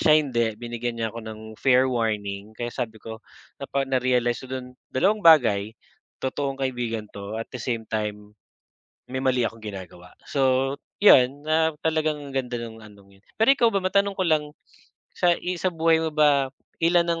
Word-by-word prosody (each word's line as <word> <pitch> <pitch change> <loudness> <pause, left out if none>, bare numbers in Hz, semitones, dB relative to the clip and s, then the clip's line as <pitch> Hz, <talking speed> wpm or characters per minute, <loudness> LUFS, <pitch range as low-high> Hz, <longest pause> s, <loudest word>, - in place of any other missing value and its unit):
siya 155 -1 +6
hindi 120 -5 0
binigyan 120 0 -4
niya 110 -1 -1
ako 115 - -7
ng 110 -1 -7 0.2
fair 130 -1 +4
warning 105 -3 -2
kaya 120 0 -4
sabi 115 -4 -4
ko, 110 0 -7 0.4
napa 140 0 -1
narealize 125 -2 +1
ko - - -18
do'n 125 -1 -6 0.2
dalawang 200 +11 +2
bagay, 110 -10 +5 0.5
totoong 135 +1 -2
kaibigan 120 -4 -2
'to 100 +1 -7
at 115 - -7
the 125 - -5
same 115 -3 -2
time, 105 -1 -3 0.8
may 130 - -2
mali 130 -2 +2
akong 115 0 -7
ginagawa. 95 -3 -9 0.2
So, 135 0 +2 0.3
'yon 140 -6 +6
na 160 0 +2
talagang 155 -3 0
ganda 125 -2 -2
nung 115 -1 -8
anong 100 -2 -17
'yon. - - -31 0.2
Pero 225 - +4
ikaw 245 -4 +3
ba 195 - +2
matanong 200 +1 +1
ko 185 - 0
lang 155 -2 +2 0.7
sa, 175 -1 +4
i 180 0 -3
sa 185 - +1
buhay 165 0 +3
mo 160 - -1
ba 145 -3 +3 0.3
ilan 170 +1 +4
ang 170 -1 0
130 Hz, 175 wpm, -24 LUFS, 110-155 Hz, 0.8 s, siya